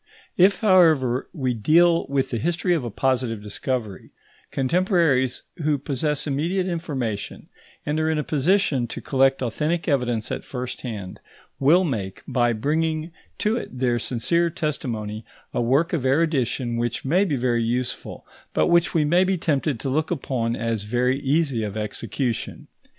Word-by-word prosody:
If, 190 +1 +4
however, 160 - +4
we 130 -7 -1
deal 165 +9 +3
with 135 -1 -1
the 120 - -1
history 175 - 0
of 160 -6 0
a 120 - -3
positive 120 -2 -1
discovery, 105 0 -4 0.4
contemporaries 140 - +1
who 150 -3 +1
possess 145 +2 -2
immediate 165 +6 0
information, 140 - -4 0.4
and 150 +1 0
are 155 0 +1
in 160 - +1
a 150 - 0
position 150 -3 +1
to - - -6
collect 135 -1 +2
authentic 155 +8 -1
evidence 125 -7 0
at - - -3
first 125 -1 -6
hand, 105 -7 -6 0.4
will 160 +7 +5
make, 105 - -3
by 120 -2 +2
bringing 155 +7 -1 0.3
to 215 +2 +1
it 130 - -7
their 120 -2 +1
sincere 170 +10 +1
testimony, 120 - -3 0.3
a - - 0
work 135 +9 +2
of 155 -7 0
erudition 130 -4 +1
which 120 +2 -2
may 175 +8 +3
be 165 -8 0
very 120 -2 +1
useful, 120 +2 -3 0.3
but - - +3
which 170 +1 +3
we 155 -2 +3
may 175 +5 +4
be 190 0 +1
tempted 145 -5 0
to 135 - -4
look 155 +3 0
upon 125 -7 -1
as 115 -2 -2
very 125 +5 +1
easy 140 -3 +1
of 105 -1 -4
execution. 115 +3 -3
135 Hz, 155 wpm, -23 LUFS, 120-165 Hz, 0.4 s, will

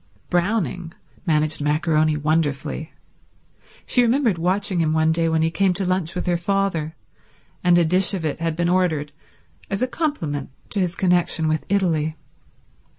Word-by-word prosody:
Browning 175 - -1 0.3
managed 155 -1 +1
maccaroni 155 +1 +1
wonderfully. 155 0 -1 0.9
She 250 - +3
remembered 235 - +2
watching 185 +2 0
him 155 -2 +1
one 160 0 +3
day 165 0 +2
when 160 0 +1
he 165 - +1
came 190 +1 +1
to 195 +1 -2
lunch 185 -1 -1
with 180 - -3
her 175 -1 +1
father, 175 -4 -1 0.7
and 175 -1 +5
a 170 - +4
dish 185 +4 +3
of 170 -4 -4
it 155 - -2
had 165 -1 -1
been 170 +1 0
ordered 170 -5 +1 0.6
as 200 +4 -1
a - - +1
compliment 170 - -3 0.2
to 205 - -1
his 180 -1 0
connection 175 -3 +1
with 155 0 -1
Italy. 160 -6 0
170 Hz, 155 wpm, -22 LUFS, 155-185 Hz, 0.9 s, and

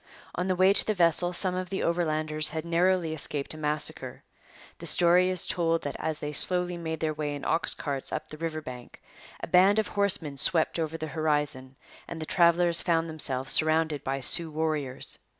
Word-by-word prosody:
On 180 +1 -3
the 185 - 0
way 185 +2 +4
to - - +4
the 215 - -2
vessel 175 0 +2
some 180 +1 +1
of 185 0 -4
the 195 - -3
Overlanders 155 -3 -1
had 160 0 -5
narrowly 170 -1 0
escaped 145 -2 -2
a - - -10
massacre. 150 0 -1 0.6
The - - -5
story 180 +1 +4
is 185 -2 -1
told 165 -1 -1
that 145 - -5
as 160 -1 -3
they 150 0 -6
slowly 180 +3 +4
made 160 -2 -5
their 155 -1 -1
way 150 -1 -4
in 145 - -8
ox 165 - +1
carts 140 -3 -4
up - - -5
the 155 - -10
river 160 -1 -4
bank, 125 -4 -11 0.4
a - - -5
band 185 +4 +4
of 220 - 0
horsemen 185 -8 +1
swept 165 +2 +3
over 160 0 -3
the 160 - -5
horizon, 150 -4 -2 0.3
and 165 - -8
the 155 - -5
travellers 170 0 +2
found 165 -1 0
themselves 135 -4 -2
surrounded 155 -2 +1
by 135 +1 -3
Sioux 165 +5 +3
warriors. 150 -4 -2
160 Hz, 195 wpm, -27 LUFS, 150-175 Hz, 0.6 s, way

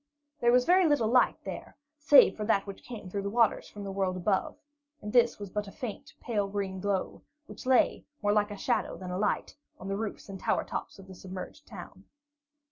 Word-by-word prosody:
There 240 -2 +4
was 250 0 +4
very 360 0 +5
little 290 -7 +2
light 250 +2 +4
there, - - -7 0.2
save 295 -1 +7
for 215 - -4
that 205 -2 +2
which 200 -1 -8
came 230 -6 -9
through 200 +2 -3
the 200 - -3
waters 230 +1 +2
from 205 - -9
the 195 - -5
world 190 -1 -1
above, 190 +1 0 0.4
and 210 -5 -7
this 240 -1 +4
was 205 -2 -8
but 210 +1 -3
a - - -9
faint, 245 +5 -7
pale 210 -4 -1
green 195 -1 -3
glow, 195 -1 -2 0.2
which 270 - -10
lay, 260 -2 +3 0.2
more 205 0 +3
like 210 0 +2
a 205 - -7
shadow - - -1
than 185 -1 -7
a 180 - -2
light 210 - -1 0.2
on 190 - -7
the 195 - -1
roofs 215 0 -5
and 195 -1 -8
tower - - 0
tops - - -6
of 195 - -13
the 190 - -10
submerged 185 +10 -9
town. 195 -2 -11
205 Hz, 215 wpm, -29 LUFS, 195-235 Hz, 0.4 s, save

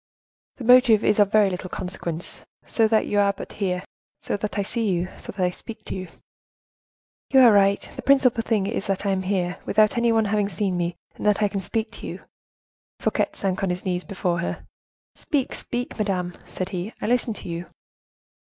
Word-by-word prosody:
"The 260 - -7
motive 245 -3 +6
is 210 - +3
of 205 -1 +4
very 215 -2 +5
little 185 -1 -4
consequence, 175 -2 -5 0.2
so 225 -1 +3
that 220 0 +3
you 205 - +1
are 200 0 +3
but - - -9
here—so 180 -2 -4
that 210 +1 -4
I 200 - +1
see 225 +1 -1
you—so 180 0 -3
that 190 -2 -2
I 180 - +1
speak 220 +3 -10
to - - -4
you!" 185 -1 -5 1.2
"You 265 - +6
are 240 -3 +8
right; 200 0 +3
the - - -5
principal 260 -4 +4
thing 220 -4 0
is 205 -1 -2
that 195 0 -1
I 200 - +2
am 190 -1 0
here 185 -2 -1
without 215 +1 +3
any 235 0 +3
one 225 -1 +3
having 205 -1 +1
seen 190 0 -1
me, 175 0 -1 0.2
and - - -10
that 210 0 +3
I - - +4
can 195 -1 -3
speak 220 +4 -2
to - - -8
you."—Fouquet - - -5
sank 190 -2 -2
on 195 - 0
his 180 +2 -3
knees 180 -1 -1
before 180 -4 -1
her. 170 - -4 0.5
"Speak! 280 -4 -1
speak, 245 0 -4
madame!" 185 -4 -1
said 185 0 -4
he, 185 +4 -5
"I - - -4
listen 240 -1 +1
to - - -9
you." 170 0 -5
200 Hz, 200 wpm, -24 LUFS, 185-220 Hz, 1.2 s, are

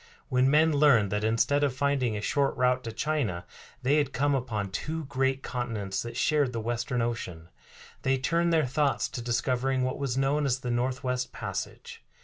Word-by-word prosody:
When 130 +1 +3
men 155 +2 +4
learned 140 -9 +4
that 105 +1 -1
instead 115 +6 +2
of 135 -3 +1
finding 130 -5 0
a - - -4
short 140 +6 0
route 125 0 +2
to 115 - -3
China 115 - -1 0.4
they 140 +4 +3
had 145 -2 0
come 145 +3 +1
upon 110 -7 -2
two 155 +9 -3
great 135 0 0
continents 110 -6 -3
that 120 - -6
shared 145 -4 +2
the 115 - -2
Western 120 +2 -1
Ocean, 90 -8 -4 0.5
they 135 0 +2
turned 170 +6 +1
their 160 -3 +3
thoughts 140 +2 +1
to 120 - -5
discovering 125 +2 0
what 130 +2 -2
was 135 -3 -2
known 140 +2 +1
as 130 0 0
the 125 - -3
Northwest 125 +1 -1
Passage. - - -6
130 Hz, 180 wpm, -28 LUFS, 120-140 Hz, 0.5 s, men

